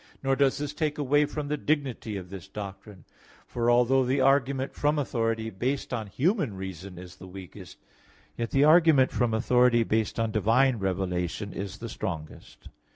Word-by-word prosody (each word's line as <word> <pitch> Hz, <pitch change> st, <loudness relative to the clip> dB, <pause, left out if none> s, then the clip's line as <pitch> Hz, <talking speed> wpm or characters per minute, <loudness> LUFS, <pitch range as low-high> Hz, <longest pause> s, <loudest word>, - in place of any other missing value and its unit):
Nor 135 Hz, 0 st, +2 dB
does 135 Hz, -1 st, +2 dB
this 145 Hz, 0 st, -4 dB
take 150 Hz, -1 st, -2 dB
away 145 Hz, +1 st, +2 dB
from 150 Hz, 0 st, -5 dB
the 150 Hz, +1 st, -1 dB
dignity 140 Hz, -8 st, -2 dB
of 90 Hz, -1 st, -9 dB
this 95 Hz, -4 st, -8 dB
doctrine, 100 Hz, -2 st, -9 dB, 0.4 s
for 120 Hz, 0 st, -1 dB
although 125 Hz, +2 st, +4 dB
the 130 Hz, +2 st, 0 dB
argument 135 Hz, 0 st, +2 dB
from 150 Hz, +1 st, 0 dB
authority 115 Hz, -5 st, -1 dB
based 130 Hz, +8 st, -3 dB
on 110 Hz, -3 st, -3 dB
human 150 Hz, -, 0 dB
reason 95 Hz, -1 st, -8 dB
is 90 Hz, 0 st, -11 dB
the 95 Hz, -, -11 dB
weakest, 95 Hz, -3 st, -11 dB, 0.6 s
yet 115 Hz, -1 st, -3 dB
the 135 Hz, -, +3 dB
argument 155 Hz, -4 st, +5 dB
from 120 Hz, -2 st, 0 dB
authority 120 Hz, +1 st, +3 dB
based 110 Hz, 0 st, -1 dB
on 115 Hz, -1 st, 0 dB
divine 115 Hz, +5 st, +3 dB
revelation 95 Hz, 0 st, -2 dB
is 100 Hz, -1 st, -6 dB
the 115 Hz, -, -7 dB
strongest. 85 Hz, -8 st, -7 dB
120 Hz, 165 wpm, -27 LUFS, 100-135 Hz, 0.6 s, argument